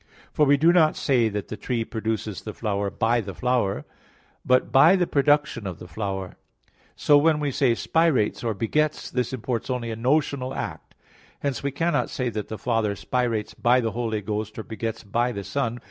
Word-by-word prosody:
For 150 - +3
we 140 +1 +5
do 165 +4 +5
not 160 -3 +4
say 120 -5 +2
that 105 -1 -5
the - - -4
tree 115 +3 -2
produces 110 -3 -3
the 105 - -7
flower 100 -2 -1
by 115 +4 +1
the 100 -3 -7
flower, 125 -5 0 0.6
but 130 0 +2
by 150 +8 +7
the 180 -2 +2
production 145 -7 +1
of 90 -3 -5
the 90 - -11
flower. 95 -2 -4 0.6
So 145 -1 +5
when 155 0 +3
we 145 -2 -1
say, 125 -3 +2
"spirates" 160 -8 +1
or 115 -3 -1
"begets," 150 +9 -1
this 125 -2 -1
imports 125 -2 -3
only 120 -3 -2
a - - -3
notional 130 +1 0
act. - - -6 0.5
Hence 140 -3 -2
we 140 - -1
cannot 165 +5 0
say 125 -3 -2
that 105 -3 -4
the 110 - -6
Father 110 -1 0
spirates 115 -1 -1
by 125 +2 +3
the 115 -2 -1
Holy 115 -2 -2
Ghost, 105 +1 -4
or 110 - -4
begets 110 0 -5
by 120 +4 0
the 100 -4 -5
Son. 120 0 -2
120 Hz, 190 wpm, -25 LUFS, 110-140 Hz, 0.6 s, by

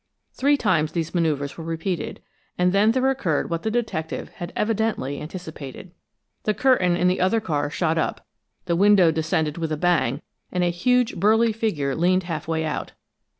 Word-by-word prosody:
Three 285 +2 +2
times 155 - +1
these 165 -2 -2
maneuvers 155 -4 -1
were - - -5
repeated, 165 +2 -4 0.3
and 180 0 +2
then 205 +2 +4
there 260 +2 +1
occurred 175 - -1
what 165 0 -1
the 220 - -1
detective 220 -9 -3
had 175 0 -8
evidently 210 - -1
anticipated. 160 -1 -8 0.5
The 215 - 0
curtain 185 -10 +3
in 180 - +2
the 180 - +1
other 190 +5 +3
car 150 -8 -1
shot 160 +1 0
up; - - -2 0.4
the 170 - 0
window 195 -2 +5
descended 160 0 -1
with 160 -1 -2
a 155 - -1
bang 155 -5 +1 0.3
and 180 -1 0
a 175 - +2
huge, 245 +5 +1
burly 220 +4 +3
figure 165 -12 -1
leaned 185 +3 +2
half 165 -3 -5
way 160 -1 -1
out. 155 - -4
175 Hz, 175 wpm, -23 LUFS, 160-210 Hz, 0.5 s, window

